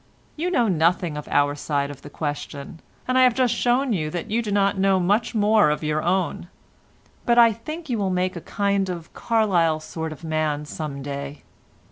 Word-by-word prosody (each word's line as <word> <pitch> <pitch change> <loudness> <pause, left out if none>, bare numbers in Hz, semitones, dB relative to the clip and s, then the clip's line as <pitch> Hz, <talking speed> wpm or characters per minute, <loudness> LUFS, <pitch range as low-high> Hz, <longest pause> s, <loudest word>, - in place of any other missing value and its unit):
You 335 +4 -1
know 245 -10 +2
nothing 170 -2 +1
of 150 - -6
our 145 0 +2
side 145 -1 -2
of 140 - -11
the 145 - -10
question, 145 0 -5 0.3
and 255 0 +2
I - - +6
have 250 -2 +4
just 250 -3 +2
shown 245 +2 +1
you 155 -5 -1
that 175 +6 -5
you 230 +2 +2
do 215 -3 -4
not 200 0 +2
know 195 0 +3
much 205 +7 +1
more 210 -3 +4
of 150 +1 -1
your 155 0 0
own, 175 0 -1 0.8
but 235 0 +2
I 230 -1 +7
think 310 +10 -8
you 240 -5 -1
will 195 -2 0
make 185 +1 0
a 170 - -6
kind 200 -1 0
of 170 -2 -6
Carlyle 180 -9 +1
sort 160 +1 -5
of 155 - -10
a - - -6
man 155 -2 -1
some 145 -2 -6
day. 140 0 -6
180 Hz, 205 wpm, -23 LUFS, 155-220 Hz, 0.8 s, I